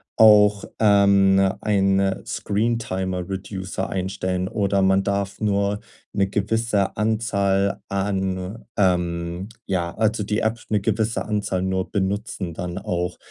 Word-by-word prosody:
auch, 105 Hz, -2 st, +6 dB
ähm 100 Hz, -2 st, +5 dB, 0.2 s
ein, 100 Hz, -2 st, +2 dB
äh, 95 Hz, -1 st, 0 dB
Screentimer-Reducer 95 Hz, -3 st, -2 dB
einstellen 95 Hz, -1 st, -2 dB
oder 100 Hz, -1 st, 0 dB
man 95 Hz, 0 st, +3 dB
darf 100 Hz, 0 st, -2 dB
nur 100 Hz, -1 st, 0 dB, 0.3 s
'ne 100 Hz, -1 st, +2 dB
gewisse 105 Hz, 0 st, 0 dB
Anzahl 100 Hz, -3 st, +1 dB
an, 95 Hz, +1 st, -2 dB
ähm 90 Hz, -1 st, 0 dB, 0.2 s
ja, 85 Hz, -3 st, -1 dB
also 110 Hz, -1 st, +1 dB
die 105 Hz, +2 st, -1 dB
App 110 Hz, +1 st, 0 dB
'ne 105 Hz, -2 st, +1 dB
gewisse 110 Hz, +3 st, 0 dB
Anzahl 105 Hz, -3 st, -1 dB
nur 95 Hz, 0 st, -2 dB
benutzen 100 Hz, -3 st, -2 dB
dann 90 Hz, 0 st, -4 dB
auch. 90 Hz, -3 st, -3 dB
100 Hz, 115 wpm, -23 LUFS, 95-105 Hz, 0.3 s, auch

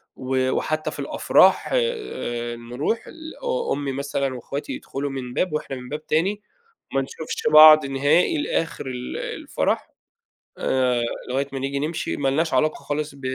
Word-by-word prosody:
و 130 Hz, 0 st, 0 dB
وحتى 155 Hz, +3 st, -1 dB
في -, -, -9 dB
الأفراح، -, -, +3 dB
آآ، 420 Hz, -, -2 dB
نرُوح 125 Hz, -, -3 dB
ال 320 Hz, -1 st, -10 dB
أ 485 Hz, -1 st, 0 dB
أمي 140 Hz, -1 st, -2 dB
مثلًا 140 Hz, -1 st, -2 dB
واخواتي 140 Hz, -, -5 dB
يدخلوا 145 Hz, -, -4 dB
من 130 Hz, -2 st, -5 dB
باب 180 Hz, +2 st, 0 dB
وإحنا 150 Hz, -3 st, -3 dB
من 125 Hz, -1 st, -9 dB
باب 150 Hz, +1 st, -6 dB
تاني، 195 Hz, +7 st, +1 dB, 0.5 s
وما 135 Hz, -, +1 dB
نشوفش 145 Hz, +4 st, -6 dB
بعض 155 Hz, -1 st, +10 dB
نهائي 145 Hz, -, +2 dB
لآخر 165 Hz, -, -2 dB
ال 125 Hz, -1 st, -5 dB
الفرح، -, -, -2 dB, 0.7 s
آآ، 125 Hz, -2 st, +1 dB, 0.3 s
لغاية 135 Hz, +2 st, 0 dB
ما 135 Hz, -, -3 dB
نيجي 140 Hz, +1 st, -2 dB
نمشي، 155 Hz, +3 st, -2 dB
ما 135 Hz, -, 0 dB
لناش 160 Hz, +4 st, +1 dB
علاقة 155 Hz, 0 st, +2 dB
خالص 150 Hz, 0 st, -3 dB
ب 140 Hz, -, -15 dB
140 Hz, 155 wpm, -23 LUFS, 130-160 Hz, 0.7 s, بعض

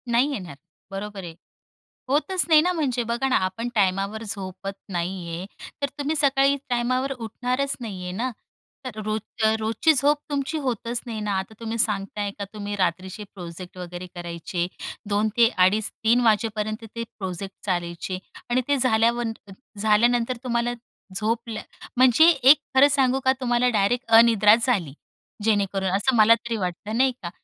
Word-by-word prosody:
नाही, 245 Hz, +5 st, +2 dB
येणार 180 Hz, -, -6 dB, 0.4 s
बरोबर 200 Hz, 0 st, -6 dB
आहे. 165 Hz, -2 st, -8 dB, 0.7 s
होतच 315 Hz, +7 st, +1 dB
नाही 310 Hz, -1 st, +7 dB
ना. 360 Hz, +3 st, +1 dB
म्हणजे 265 Hz, -7 st, 0 dB
बघा 240 Hz, +3 st, 0 dB
ना, -, -, +2 dB
आपण 225 Hz, +6 st, -3 dB
टाइमावर 200 Hz, +2 st, +1 dB
झोपत 195 Hz, -2 st, -5 dB, 0.2 s
नाही 175 Hz, 0 st, -3 dB
आहे, 170 Hz, +2 st, -5 dB, 0.4 s
तर 280 Hz, -, 0 dB
तुम्ही 290 Hz, +2 st, -1 dB
सकाळी 275 Hz, -1 st, +3 dB
टाइमावर 255 Hz, +2 st, 0 dB
उठणारच 250 Hz, +3 st, -2 dB
नाही 200 Hz, -6 st, -6 dB
आहे 180 Hz, -, -4 dB
ना. 235 Hz, +7 st, -2 dB, 0.5 s
तर 230 Hz, -4 st, -6 dB
रोज 215 Hz, +1 st, -2 dB, 0.4 s
रोजची 225 Hz, +8 st, +2 dB
झोप 290 Hz, +1 st, +3 dB
तुमची 285 Hz, +2 st, -2 dB
होतच 240 Hz, -3 st, -2 dB
नाही 225 Hz, -3 st, -5 dB
ना. 210 Hz, -1 st, -2 dB
आता 190 Hz, +3 st, -7 dB
तुम्ही 230 Hz, 0 st, -4 dB
सांगताय, 205 Hz, -1 st, -1 dB
का 200 Hz, -, -3 dB
तुम्ही 205 Hz, -1 st, -4 dB
रात्रीचे 185 Hz, +2 st, -2 dB
प्रोजेक्ट 180 Hz, 0 st, -9 dB
वगैरे 180 Hz, 0 st, -7 dB
करायचे 175 Hz, 0 st, -4 dB, 0.4 s
2 210 Hz, +1 st, +1 dB
ते 235 Hz, -1 st, +7 dB
2:30-3 220 Hz, +5 st, +2 dB
वाजेपर्यंत 215 Hz, 0 st, 0 dB
ते 230 Hz, -, -3 dB, 0.2 s
प्रोजेक्ट 190 Hz, 0 st, -5 dB
चालायचे 175 Hz, -1 st, -2 dB, 0.3 s
आणि 245 Hz, +1 st, +2 dB
ते 285 Hz, 0 st, +2 dB
झाल्यावर 235 Hz, -1 st, +2 dB, 0.5 s
झाल्यानंतर 230 Hz, +3 st, +2 dB
तुम्हाला 240 Hz, -1 st, 0 dB, 0.4 s
झोपलं 220 Hz, +1 st, -2 dB, 0.4 s
म्हणजे 255 Hz, +5 st, +6 dB
एक 275 Hz, -2 st, +6 dB, 0.2 s
खरं 270 Hz, +2 st, +8 dB
सांगू 265 Hz, -2 st, +2 dB
का, 260 Hz, -, +6 dB
तुम्हाला 245 Hz, -1 st, +2 dB
डायरेक्ट 235 Hz, +3 st, +1 dB
अनिद्राच 225 Hz, -1 st, +5 dB
झाली. 190 Hz, -, 0 dB, 0.5 s
जेणेकरून 200 Hz, -3 st, +1 dB
असं 205 Hz, +7 st, +2 dB
मला 220 Hz, 0 st, +7 dB
तरी 230 Hz, 0 st, -4 dB
वाटतं, 200 Hz, +3 st, -3 dB
नाही 260 Hz, +1 st, +4 dB
का? 170 Hz, -, -3 dB
220 Hz, 150 wpm, -24 LUFS, 195-250 Hz, 0.7 s, खरं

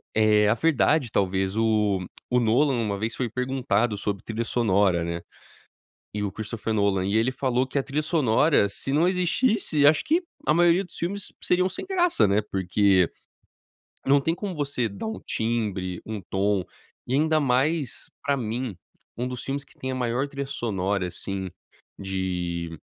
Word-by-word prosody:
eh, 105 Hz, -1 st, +4 dB
a 105 Hz, -, +5 dB
verdade 145 Hz, -2 st, +2 dB
talvez 95 Hz, +1 st, 0 dB
o 105 Hz, -4 st, +2 dB, 0.2 s
o 125 Hz, 0 st, +3 dB
Nolan 125 Hz, +5 st, +3 dB
uma 105 Hz, -4 st, -1 dB
vez 110 Hz, +3 st, -2 dB
foi 125 Hz, -3 st, -1 dB
perguntado 120 Hz, -3 st, 0 dB
sobre 100 Hz, -1 st, -3 dB
trilha 115 Hz, +1 st, -3 dB
sonora, 100 Hz, -7 st, +2 dB
né. 85 Hz, 0 st, -3 dB, 0.9 s
E 105 Hz, -, -2 dB
o 100 Hz, -2 st, -2 dB
Christopher 110 Hz, +1 st, -4 dB
Nolan, 100 Hz, -3 st, +1 dB
e 100 Hz, -, +1 dB
ele 115 Hz, +3 st, +2 dB
falou 130 Hz, -1 st, 0 dB
que 135 Hz, +2 st, -2 dB
a -, -, +1 dB
trilha 140 Hz, +3 st, -2 dB
sonora 150 Hz, -, +3 dB
se 135 Hz, +6 st, -4 dB
não 160 Hz, +4 st, +4 dB
existisse 180 Hz, -, +2 dB
acho 150 Hz, +1 st, +5 dB
que 330 Hz, +4 st, +2 dB, 0.2 s
a 150 Hz, -, +4 dB
maioria 175 Hz, +2 st, +4 dB
dos 180 Hz, -, -12 dB
filmes 195 Hz, +3 st, -3 dB
seriam 180 Hz, +1 st, +2 dB
sem 190 Hz, -, -6 dB
graça 355 Hz, -, +3 dB
né, 100 Hz, +2 st, +3 dB
porque, 95 Hz, -1 st, +3 dB, 1.0 s
não 140 Hz, +1 st, +4 dB
tem 165 Hz, +4 st, 0 dB
como 200 Hz, +1 st, -4 dB
você 140 Hz, -6 st, -1 dB
dar 100 Hz, -, -6 dB
um 220 Hz, -, -4 dB
timbre, 105 Hz, -6 st, -2 dB
um 110 Hz, -2 st, -5 dB
tom, 95 Hz, -1 st, +1 dB, 0.4 s
e 125 Hz, -, -2 dB
ainda 155 Hz, +2 st, +3 dB
mais 140 Hz, +1 st, 0 dB
pra 140 Hz, 0 st, +1 dB
mim, 120 Hz, -3 st, -3 dB, 0.4 s
um 125 Hz, +1 st, -2 dB
dos 125 Hz, -1 st, -6 dB
filmes 140 Hz, +1 st, -3 dB
que -, -, -22 dB
tem 130 Hz, 0 st, -3 dB
a -, -, -2 dB
maior 125 Hz, +2 st, 0 dB
trilha 140 Hz, 0 st, -4 dB
sonora 100 Hz, -8 st, -1 dB
assim 95 Hz, +1 st, -4 dB, 0.5 s
de, 90 Hz, -3 st, -3 dB
115 Hz, 170 wpm, -25 LUFS, 100-145 Hz, 1.0 s, a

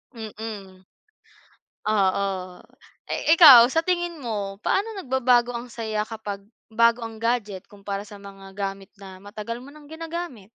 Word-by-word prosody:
Mm. 215 Hz, -4 st, -8 dB, 1.0 s
Oo. 200 Hz, -2 st, +2 dB, 0.8 s
Eh, 320 Hz, -, +3 dB
ikaw, 260 Hz, -8 st, +10 dB
sa 325 Hz, +4 st, +1 dB
tingin 345 Hz, -2 st, -1 dB
mo, 205 Hz, -6 st, -4 dB
paano 430 Hz, +2 st, 0 dB
nagbabago 250 Hz, -5 st, +2 dB
ang 235 Hz, +1 st, -6 dB
saya 220 Hz, -2 st, -3 dB
kapag 210 Hz, -3 st, -6 dB, 0.3 s
bago 230 Hz, +1 st, +3 dB
ang 225 Hz, -1 st, -9 dB
gadget 215 Hz, -5 st, -2 dB
kumpara 200 Hz, -1 st, -6 dB
sa 205 Hz, -1 st, -11 dB
mga 195 Hz, -1 st, -12 dB
gamit 195 Hz, -1 st, -4 dB
na 190 Hz, -1 st, -12 dB
matagal 215 Hz, +3 st, -7 dB
mo 275 Hz, -, -12 dB
nang 300 Hz, 0 st, -15 dB
ginagamit? 330 Hz, -, -6 dB
225 Hz, 135 wpm, -24 LUFS, 200-260 Hz, 1.0 s, ikaw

